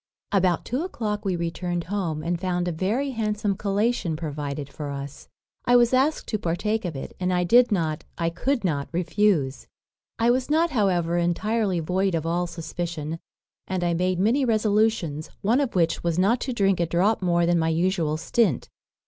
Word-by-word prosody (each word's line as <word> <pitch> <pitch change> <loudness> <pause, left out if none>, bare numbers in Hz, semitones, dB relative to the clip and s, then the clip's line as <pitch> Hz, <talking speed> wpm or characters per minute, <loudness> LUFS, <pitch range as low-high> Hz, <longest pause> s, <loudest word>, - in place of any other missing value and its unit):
"About 185 -4 +2
two 255 +5 -2
o'clock 215 - -3
we 190 -3 0
returned 175 +1 -2
home, 170 -5 -3
and 170 +1 -2
found 180 -1 -1
a - - 0
very 215 - -1
handsome 210 -3 -1
collation 200 -3 0
provided 145 -3 -4
for 145 0 -7
us. 140 0 -7 0.4
I 245 - +4
was 240 0 +5
asked 275 +5 +2
to 215 - -1
partake 210 +5 -1
of 170 -4 -3
it, 135 - -7
and 180 0 0
I 180 0 +2
did 240 +7 +5
not, 160 -6 0
I 170 -1 0
could 255 +8 -1
not 145 -6 -1
refuse. 175 -5 +1 0.5
I 230 +1 +3
was 255 +2 0
not, 325 +2 +2
however, 175 - +1
entirely 190 +2 0
void 185 +3 0
of 160 -1 -2
all 175 +2 0
suspicion, 165 -2 -5 0.5
and 185 -1 -2
I 175 -1 +1
made 180 +2 0
many 230 +9 +2
resolutions; 215 - +1
one 235 +7 +3
of 270 -7 -2
which 170 -2 +1
was, 170 -1 0
not 205 +7 +3
to 260 - -3
drink 195 -6 +2
a 170 - +1
drop 190 +7 +2
more 175 -2 +2
than 170 0 +2
my 160 0 +1
usual 165 -2 +1
stint. 185 - +1
180 Hz, 180 wpm, -25 LUFS, 165-215 Hz, 0.5 s, was